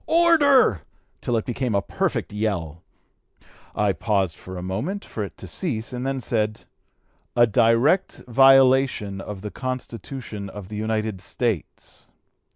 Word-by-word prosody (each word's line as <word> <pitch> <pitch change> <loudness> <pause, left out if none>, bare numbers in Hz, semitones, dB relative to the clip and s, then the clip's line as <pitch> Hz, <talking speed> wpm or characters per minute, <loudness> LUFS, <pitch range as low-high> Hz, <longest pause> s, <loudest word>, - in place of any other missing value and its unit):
order!' 290 - +5 0.4
till 120 - 0
it 110 - -2
became 125 -2 -2
a 100 - +2
perfect - - -2
yell. 90 -7 -2 0.9
I 105 -2 +2
paused 95 -6 -1
a 95 -1 -6
moment 150 - -3
for 110 - -5
it 100 - -8
to 95 - -9
cease 120 - -3
and 125 +1 -3
then 135 -1 -2
said, 110 -2 -2 0.7
'a 120 - +6
direct 115 - +2
violation 130 -5 +4
of 100 -1 -7
the 105 - -5
Constitution 125 -4 -6
of 100 -1 -9
the 105 - -6
United 110 -2 -2
States.' 105 - -4
110 Hz, 135 wpm, -23 LUFS, 100-130 Hz, 0.9 s, a